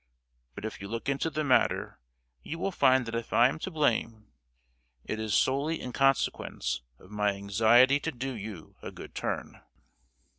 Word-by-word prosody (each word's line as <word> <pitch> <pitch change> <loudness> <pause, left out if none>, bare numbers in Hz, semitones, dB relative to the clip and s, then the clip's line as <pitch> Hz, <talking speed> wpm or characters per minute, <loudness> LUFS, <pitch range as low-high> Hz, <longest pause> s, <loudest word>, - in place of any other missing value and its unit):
But 105 - -6
if 110 - -6
you 100 - -6
look 115 +2 -5
into 140 +4 0
the 155 -1 -2
matter 135 -3 +1 0.4
you 165 - -6
will 195 +3 -1
find 130 -7 +4
that 115 - -6
if 115 0 -4
I 120 +2 +6
am 155 - -5
to 190 - -4
blame 115 - -1 0.7
it 110 - -3
is 110 -1 -1
solely 140 +7 +1
in 125 - -6
consequence 135 - 0 0.2
of 95 - -18
my 105 -1 +1
anxiety 115 +7 +4
to 160 - -3
do 135 0 -4
you 100 -6 -8
a - - -7
good - - -11
turn!" - - -4
120 Hz, 175 wpm, -29 LUFS, 110-140 Hz, 0.7 s, I